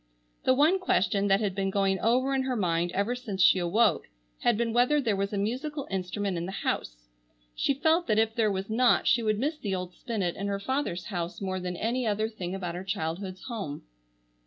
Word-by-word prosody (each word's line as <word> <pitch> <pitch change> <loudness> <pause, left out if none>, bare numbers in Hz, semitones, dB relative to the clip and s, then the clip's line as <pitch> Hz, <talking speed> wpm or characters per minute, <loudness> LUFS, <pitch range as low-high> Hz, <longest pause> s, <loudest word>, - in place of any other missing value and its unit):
The 260 - +5
one 315 +8 +4
question 200 - +1
that 195 +1 +3
had 200 -3 0
been 195 0 -1
going 195 -1 +1
over 255 +6 +2
in 265 - +2
her 260 -1 -1
mind 175 -4 0
ever 200 +5 0
since 240 -6 -6
she 185 0 +6
awoke 205 +6 +2 0.3
had 240 -3 +2
been 230 -1 0
whether 250 +5 +4
there 230 -7 +1
was 200 +1 -1
a 205 - -2
musical 265 +8 -2
instrument 190 0 -2
in 170 +1 -3
the - - -4
house. - - -3 0.5
She 275 - 0
felt 320 +4 +2
that 215 -2 +2
if 220 0 +2
there 220 -2 +2
was 190 0 -3
not 235 +2 +3
she 240 - +4
would 215 -2 +1
miss 300 +7 -1
the 195 -3 -2
old 180 -1 -5
spinet 195 -7 -3
in 200 - -3
her 200 0 -1
father's 230 -5 -2
house 175 0 -3
more 185 -1 -2
than 180 -1 -4
any 235 +4 -1
other 215 +1 0
thing 185 -4 -5
about 180 -3 -4
her 180 +2 -5
childhood's 185 +1 -4
home. 205 - -5
205 Hz, 215 wpm, -28 LUFS, 185-240 Hz, 0.5 s, she